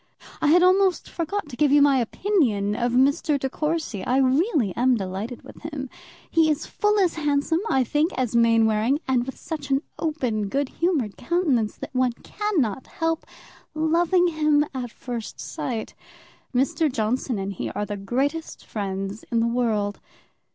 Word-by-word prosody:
I - - +2
had 350 +4 +6
almost 370 -1 +3
forgot 340 +2 -3
to 250 - -7
give 295 +1 +3
you 290 - +6
my 280 -1 +5
opinion 230 - +1
of 240 +1 0
Mr. 280 +3 +3
De 270 - -1
Courcy; 305 - -2
I 250 +5 +1
am 260 -1 +4
really 295 - +1
delighted 230 -2 -1
with - - -13
him; 290 -4 -6 0.4
he 325 -1 +3
is 305 0 0
full 420 0 +1
as 365 -4 +3
handsome, 295 +1 +1
I 265 -1 +3
think, 300 +7 +1
as 250 -3 -1
Mainwaring, 230 +2 +3
and 250 -1 +1
with 265 - -6
such 295 -3 -6
an 270 +2 +2 0.2
open, 250 -10 -1
good 275 +4 -1
humoured 305 - -1
countenance, 290 - 0
that - - -8
one 255 -1 +2
cannot 275 - -2
help 325 -1 -2 0.5
loving 340 +3 +3
him 305 -2 +2
at 250 -2 -4
first 235 - -6
sight. 150 - -4 0.6
Mr. 275 +4 +1
Johnson 240 0 -1
and 195 0 -3
he - - -4
are 210 - -3
the 205 - -4
greatest 270 +11 -2
friends 195 0 -4
in 230 - +2
the 230 - +2
world. 220 -4 0
265 Hz, 165 wpm, -24 LUFS, 230-315 Hz, 0.6 s, had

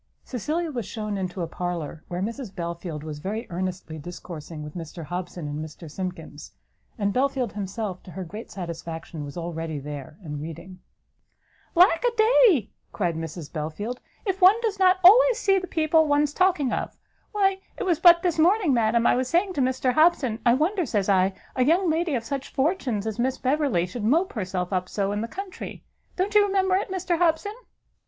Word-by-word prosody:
Cecilia 310 - -2
was 240 -7 -4
shewn 215 -2 -4
into 185 -2 -3
a - - -3
parlour, 170 -3 -4
where 180 +1 -3
Mrs 225 -1 -5
Belfield 170 -3 -5
was 155 -2 -6
very 215 +8 -4
earnestly 180 -3 -4
discoursing 165 -1 -8
with 150 0 -8
Mr 165 0 -7
Hobson 175 -1 -5
and 145 +1 -4
Mr 155 0 -10
Simkins; 185 +2 -7 0.4
and 200 -2 0
Belfield 260 -3 0
himself, 200 -1 -4
to - - -14
her 190 - -5
great 210 +7 -8
satisfaction, 165 -3 -6
was 145 +3 -8
already 165 -2 -4
there, 145 +1 -7
and 150 -3 -5
reading. 175 +4 -8 1.0
"Lack 340 +1 +5
a - - +4
day!" 435 - +5 0.2
cried 175 -5 -1
Mrs 160 -1 -6
Belfield, 170 +10 -4 0.2
"if 385 -1 -1
one 380 +5 +7
does 430 -4 -1
not 370 0 +5
always - - +8
see 390 -5 +3
the 370 - -7
people 315 -1 +3
one's 290 0 +2
talking 355 -8 +2
of! - - -3 0.3
Why 390 -2 +2 0.2
it - - -3
was 345 -5 +1
but 340 -2 +7
this 345 -3 0
morning, 355 -1 +4
madam, 235 0 +2
I - - +5
was 255 0 0
saying 365 +7 +1
to 285 - -1
Mr 255 0 +1
Hobson, 310 -8 +3
I 235 0 +5
wonder, 355 +7 +1
says 210 - -1
I, 190 0 +3 0.2
a 255 - +3
young 335 +5 +3
lady 325 -2 0
of 235 - -2
such 275 +2 -4
fortunes 265 - 0
as 220 0 -4
Miss 260 +2 0
Beverley 265 - +1
should 210 +5 -6
mope 320 - +2
herself 185 -3 -3
up 185 0 -1
so 200 -1 -1
in 205 +1 -2
the 230 - -3
country! 380 +7 -7 0.3
Don't 385 +3 -1
you 420 -1 +7
remember 385 -2 +2
it, 390 - -1
Mr 365 -2 -1
Hobson?" 350 +4 +2
235 Hz, 190 wpm, -25 LUFS, -, 1.0 s, always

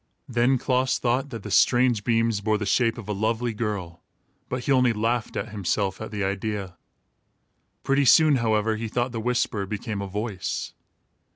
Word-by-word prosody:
Then 125 +2 +2
Klaas 130 0 +1
thought 130 +3 0
that 115 -5 -7
the 105 - -7
strange 120 0 +3
beams 115 -2 +1
bore 110 +1 +1
the 105 - -3
shape 115 +3 +2
of 115 - -8
a 105 - -1
lovely 110 +3 -1
girl, 100 -6 -4 0.5
but 125 -1 -3
he - - -1
only 125 -3 +4
laughed 115 +2 -1
at 105 - -3
himself 100 -1 -2
at 110 - -5
the 105 -2 -3
idea. 100 -1 -3 1.1
Pretty 135 +1 +2
soon, 155 +2 +6
however, 110 -2 +1
he 115 +1 -4
thought 120 +3 -1
the 115 -2 -4
whisper 120 -4 -1
became 105 0 -4
a 100 - -4
voice. 100 -2 -4
115 Hz, 175 wpm, -25 LUFS, 105-125 Hz, 1.1 s, soon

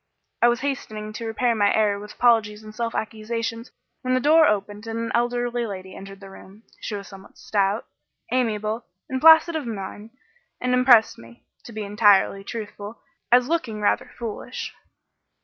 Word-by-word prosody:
I 240 - +6
was 240 0 +1
hastening 215 -6 -4
to 230 +1 -5
repair 235 +2 +1
my 205 -2 +2
error 210 -2 +2
with 210 +1 -10
apologies 220 -3 +2
and 215 0 -11
self 230 +1 -3
accusations, 230 +2 -4 0.3
when 255 -1 0
the - - +2
door 310 +4 +5
opened 205 +1 -2
and 225 0 -4
an 230 0 -3
elderly 240 0 0
lady 190 -2 -8
entered 195 0 -10
the 195 -1 -11
room. 195 +3 -15 0.2
She 210 - -5
was 200 -1 -7
somewhat 195 0 -14
stout, 200 +1 0 0.5
amiable 220 -2 -1 0.2
and 260 0 -3
placid 320 +1 +7
of 300 -6 -3
mien, 205 0 -6 0.5
and 250 0 0
impressed 250 -3 +5
me 115 +1 -16 0.2
(to - - -10
be 215 -1 -5
entirely 205 -1 +3
truthful) 210 0 -7 0.3
as 245 0 +5
looking 255 -10 -2
rather 210 - 0
foolish. 230 -3 -6
220 Hz, 165 wpm, -23 LUFS, 205-240 Hz, 0.5 s, placid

